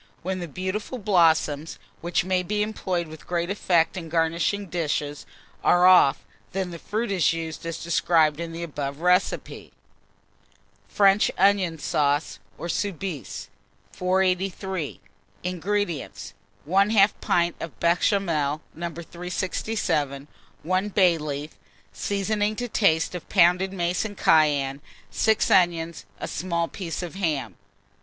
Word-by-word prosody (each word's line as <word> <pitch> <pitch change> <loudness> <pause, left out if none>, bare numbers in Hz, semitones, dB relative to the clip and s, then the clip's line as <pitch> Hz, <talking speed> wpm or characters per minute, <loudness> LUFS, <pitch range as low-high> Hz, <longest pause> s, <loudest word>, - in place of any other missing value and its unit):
When 185 +1 -2
the 175 - -5
beautiful 190 - -4
blossoms, 165 -7 +2 0.2
which 175 +1 0
may 185 -1 +1
be 210 +3 -1
employed 185 -5 -2
with 155 0 -12
great 175 +1 -1
effect 175 -5 +2
in 170 -3 -6
garnishing 170 +5 0
dishes, 150 -4 -3 0.4
are 175 0 +5
off, 180 -7 +6 0.3
then 190 -1 -2
the 170 - -8
fruit 215 +4 -2
is 180 -4 +3
used 165 0 -5
as 165 0 -3
described 165 -2 +2
in 170 -1 -4
the 165 +1 -5
above 145 -2 -5
recipe. 180 +2 0 1.2
FRENCH 200 0 +4
ONION 190 -3 +3
SAUCE, 145 -1 0 0.2
or 170 - -5
SOUBISE. 180 - -4 0.4
483. 185 -2 -1 0.4
INGREDIENTS. 180 -2 -3 0.3
1/2 200 +3 +5
pint 170 0 +1
of 165 - -7
Béchamel, 170 -4 +1
No. 170 +1 -4
367, 170 -4 -3 0.4
1 185 +4 0
bay 185 -5 +3
leaf, 150 0 -5 0.3
seasoning 205 +1 -1
to 245 +2 -3
taste 175 -9 +2
of 180 -3 -7
pounded 180 +1 +4
mace 175 -1 -1
and 205 -2 -6
cayenne, 145 -3 +3 0.3
6 220 -1 +2
onions, 170 -3 +2
a - - -4
small 170 0 -2
piece 180 -1 -5
of 175 - -6
ham. 150 - -2
175 Hz, 125 wpm, -25 LUFS, 160-195 Hz, 1.2 s, off